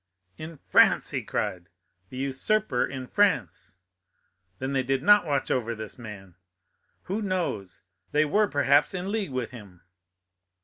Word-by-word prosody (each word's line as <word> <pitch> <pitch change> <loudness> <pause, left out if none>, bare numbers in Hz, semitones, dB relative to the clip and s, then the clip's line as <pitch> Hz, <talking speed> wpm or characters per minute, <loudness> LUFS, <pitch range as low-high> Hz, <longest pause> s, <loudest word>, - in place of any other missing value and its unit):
"In 155 0 -9
France!" - - +3
he - - -2
cried, 90 0 -3 0.4
"the 130 - -9
usurper 135 +3 0
in 130 -1 -5
France! 190 - 0 0.8
Then 130 +1 -3
they 135 - +2
did 135 +1 -1
not 205 -2 +6
watch 140 -2 -1
over 115 -2 -1
this 110 +2 -9
man. 100 -5 -10 0.7
Who 200 +4 -3
knows? 105 - -3 0.3
they 150 +1 +3
were, 205 +8 +2
perhaps, 145 +2 +2
in 185 +2 -3
league 215 -5 -2
with 130 -3 -4
him." 100 -7 -13
135 Hz, 140 wpm, -26 LUFS, 115-180 Hz, 0.8 s, not